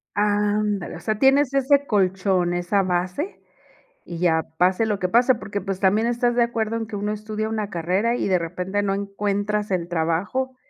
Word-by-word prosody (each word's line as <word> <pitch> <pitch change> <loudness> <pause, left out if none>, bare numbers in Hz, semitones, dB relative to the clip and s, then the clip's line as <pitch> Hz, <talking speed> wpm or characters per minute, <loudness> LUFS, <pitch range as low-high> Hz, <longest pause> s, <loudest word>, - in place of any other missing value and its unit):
Ándale. 205 -1 0
O - - -10
sea, 215 -1 -2
tienes 270 0 +4
ese 280 +1 +3
colchón, 190 -3 +1
esa 175 +3 +1
base 185 - -2 0.7
y 170 -1 -7
ya 160 -2 +2
pase 185 +5 +3
lo 210 -2 -1
que 180 - -1
pase. 245 +3 +4
Porque 205 -3 -5
pues 195 -1 -4
también 210 +4 +2
estás 240 0 +1
de 240 - +4
acuerdo 225 -1 -2
en 225 - -3
que 210 - -7
uno 205 +1 -2
estudia 215 +1 -4
una 215 -2 -3
carrera 185 +7 0
y - - -1
de 185 -2 +3
repente 180 +4 -3
no 195 -1 0
encuentras 205 +1 -2
el 175 -2 -1
trabajo 175 +11 -1
205 Hz, 185 wpm, -23 LUFS, 185-225 Hz, 0.7 s, tienes